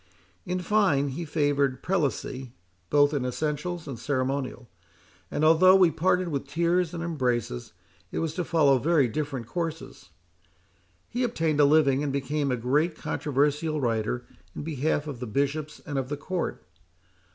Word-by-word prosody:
In 180 +1 -1
fine, 180 -8 +2
he 160 +6 -5
favoured 145 -4 0
Prelacy 135 -7 -2 0.4
both 145 0 +4
in 140 -3 0
essentials 155 +6 -3
and 130 -5 -6
ceremonial; 130 -1 -2 0.6
and 155 - 0
although, 175 +4 +7
we 185 -3 +5
parted 180 +3 +1
with 140 -3 -3
tears 170 +3 +1
and 165 - -4
embraces, 125 - -2 0.4
it - - -4
was 160 -2 -1
to 180 - -2
follow 150 -6 +3
very 150 -1 +3
different 140 -1 -3
courses. 165 +5 -5 1.0
He 245 - -3
obtained 165 - 0
a 145 - +7
living, 140 -2 +4
and 145 -2 -1
became 140 +1 -1
a 125 - 0
great 145 +8 +1
controversial 150 +2 0
writer 120 -1 -1 0.3
in - - -5
behalf 150 -1 -1
of 145 -5 -6
the 125 - -5
Bishops 140 +6 -2
and 145 -2 -2
of 130 -1 -4
the 145 - -3
Court. 175 +5 -4
145 Hz, 150 wpm, -27 LUFS, 135-165 Hz, 1.0 s, although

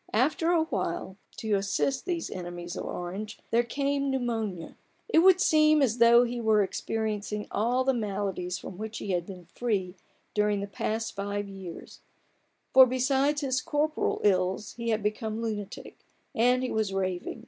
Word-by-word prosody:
After 295 +8 +2
a 340 -2 +4
while, 190 - -3 0.2
to 220 -2 -2
assist 200 - 0
these 345 -2 -2
enemies 175 -1 -6
of - - -5
Orange, 195 +5 -5
there 235 - +4
came 280 +3 -1
pneumonia. 225 -9 -2 0.3
It 380 - +4
would 370 +1 +6
seem 305 -3 +5
as 235 -2 +1
though 235 +1 +7
he 240 0 -3
were 215 -2 +4
experiencing 210 0 -3
all 240 +5 +1
the 265 0 +2
maladies 195 -5 -2
from 190 -1 -9
which 220 +1 -5
he 200 - -4
had 175 -2 -1
been 180 -3 -9
free 190 -1 -2 0.4
during 210 -1 +1
the 200 - -3
past 220 +3 -3
five 200 0 -3
years; 190 -3 -9 0.7
for 260 0 +9
besides 270 +3 +1
his 260 -2 0
corporal 300 +1 0
ills 190 0 +1
he 235 -1 -4
had 220 -2 0
become 215 +1 -2
lunatic, 215 -3 -5 0.3
and 250 +2 +3
he 255 - -2
was 220 -2 0
raving. 185 -2 -2
220 Hz, 160 wpm, -28 LUFS, 195-255 Hz, 0.7 s, for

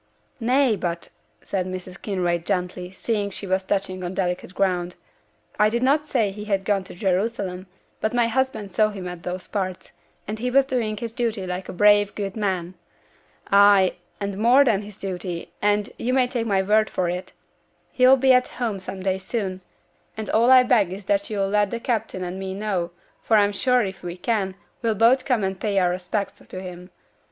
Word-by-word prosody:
'Nay, 250 0 +3
but,' 170 -3 -4 0.3
said 185 -2 -2
Mrs. 185 0 -7
Kinraid, 175 -4 -1
gently, 180 -1 -2
seeing 205 0 -1
she 200 - -6
was 190 0 0
touching 185 -1 -2
on 180 +1 -4
delicate 180 0 -2
ground, 180 -2 0 0.6
'I 210 0 +5
did 235 +3 -1
not 295 +3 +2
say 225 -8 +1
he 210 +1 -8
had 195 -2 -1
gone 200 -2 +1
to - - -10
Jerusalem, 190 0 -1 0.3
but 220 - 0
my 240 -1 +2
husband 230 -4 -1
saw 215 +3 +3
him 195 -3 -7
in 180 -1 -7
those 180 +1 -5
parts, 185 -3 -4 0.4
and 215 +1 -4
he 250 +2 -1
was 270 +2 +4
doing 230 -5 -1
his 230 +1 -4
duty 230 -5 -2
like 180 +1 -5
a - - -3
brave, 205 +1 +4
good 200 -2 -4
man; 185 -5 -2 0.8
ay, 200 -2 +6 0.3
and 200 -1 -4
more 250 +6 +6
than 210 -5 +2
his 205 -1 -11
duty; 180 -3 -5
and, 205 0 +2
you 250 +2 -1
may 260 -1 +4
take 240 -2 -2
my 195 -2 +2
word 215 +2 +3
for 180 - -1
it, 180 +1 -4 0.6
he'll 255 +1 +6
be 265 0 +5
at 250 0 +4
home 225 -5 -3
some 190 0 -7
day 190 0 0
soon, 190 -2 -3 0.6
and 220 -1 -4
all 230 +3 +4
I 260 -1 +8
beg 220 -7 +3
is 195 +1 -7
that 200 0 0
you'll 200 -2 -1
let 205 0 +2
the 235 - -3
captain 225 -6 -2
and 180 +1 -5
me 190 0 -4
know, 195 -4 -2 0.3
for 220 - +3
I'm 205 -1 +4
sure 250 +3 +2
if 190 0 -7
we 175 0 -6
can, 195 -2 -1 0.3
we'll 225 -3 +1
both 240 +5 +4
come 245 -6 +1
and 190 0 -2
pay 205 -2 0
our 180 -2 +3
respects 195 +2 -3
to 185 - -9
him. 180 -1 -9
200 Hz, 200 wpm, -23 LUFS, 185-225 Hz, 0.8 s, I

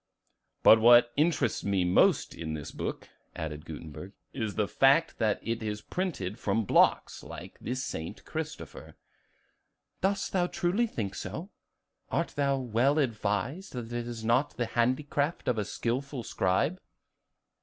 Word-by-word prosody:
"But 110 - +8
what 120 +1 +7
interests 145 -6 +1
me 95 -3 +1
most 90 - +3
in 80 -2 -5
this 75 -2 -6
book," - - -5 0.3
added 75 0 -5
Gutenberg, 80 +4 -8 0.2
"is 110 -5 -3
the 105 -2 +1
fact 140 +9 +3
that 110 -2 +1
it 115 0 -2
is 105 -1 -3
printed 120 - -3
from 115 -2 0
blocks, - - +3
like - - -10
the 125 - -3
'St. 85 -11 -5
Christopher.'" - - -6 1.1
"Dost 195 +1 0
thou 180 -2 +2
truly 185 +8 0
think 100 - -4
so? 160 - -6 0.6
Art 170 - 0
thou 140 -1 0
well 130 +3 +1
advised 120 - -1
that 120 -2 -6
it 120 0 -3
is 115 -2 -6
not 125 +6 +2
the 120 - 0
handicraft 140 +6 0
of 120 -3 +1
a - - +1
skillful 130 +4 -3
scribe?" 95 - 0
120 Hz, 145 wpm, -29 LUFS, 105-145 Hz, 1.1 s, But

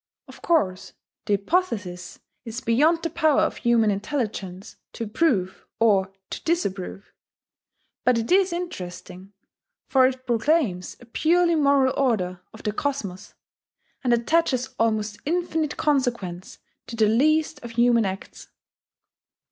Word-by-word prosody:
Of - - -14
course 195 - 0 0.3
the 205 - +2
hypothesis 200 - -2 0.3
is 230 0 -5
beyond 300 +9 +2
the 330 - -1
power 315 -3 +3
of - - 0
human 230 -3 +3
intelligence 200 -4 -4 0.2
to 230 - -4
prove 210 - 0
or 195 -4 +3 0.2
to - - -6
disprove. 200 - -3 0.9
But 250 -1 +3
it 230 +5 -2
is 380 0 +4
interesting, 185 - -7 0.6
for 260 -1 +5
it 260 0 -5
proclaims 235 - 0
a - - -13
purely 340 +8 +2
moral 280 -4 +3
order 185 -9 0
of 220 - -13
the 210 - 0
cosmos, 210 -7 -4 0.7
and 250 - +1
attaches 255 +1 +1
almost 215 -2 0
infinite 320 -2 -1
consequence 235 - -1 0.3
to 235 - -6
the 220 -1 +3
least 300 +6 +2
of 235 -1 -8
human 235 0 +4
acts. 190 0 -6
235 Hz, 125 wpm, -24 LUFS, 200-300 Hz, 0.9 s, for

